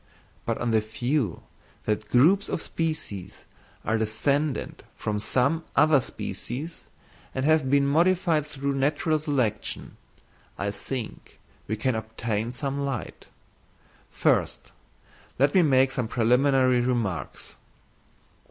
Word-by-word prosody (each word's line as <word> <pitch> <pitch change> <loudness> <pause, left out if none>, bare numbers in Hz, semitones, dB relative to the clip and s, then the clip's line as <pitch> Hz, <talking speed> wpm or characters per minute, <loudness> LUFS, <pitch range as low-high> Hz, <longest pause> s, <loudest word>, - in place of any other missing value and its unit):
But - - 0
on 120 - -1
the 110 -1 +4
view 115 - -1 0.4
that 105 0 -1
groups 175 +11 +4
of - - -1
species 155 - -4 0.4
are 110 +1 +1
descended 140 +7 -1
from 105 -1 -2
some 140 +9 +1
other 150 -2 +5
species, 140 +6 -6 0.6
and 130 0 -1
have 155 -3 +3
been 140 0 +4
modified 165 0 +2
through 140 -1 -2
natural 145 +3 +1
selection, 130 -9 -2 0.6
I 100 0 -1
think 120 +2 -7 0.3
we 110 - -1
can 125 +4 0
obtain 110 0 -3
some 140 +2 -3
light. 140 -3 -4 0.8
First - - 0 0.7
let 140 +3 +3
me 185 - +6
make 135 -4 +4
some 125 -4 -2
preliminary 125 +2 +3
remarks. 120 -8 -2
130 Hz, 115 wpm, -26 LUFS, 110-145 Hz, 0.8 s, me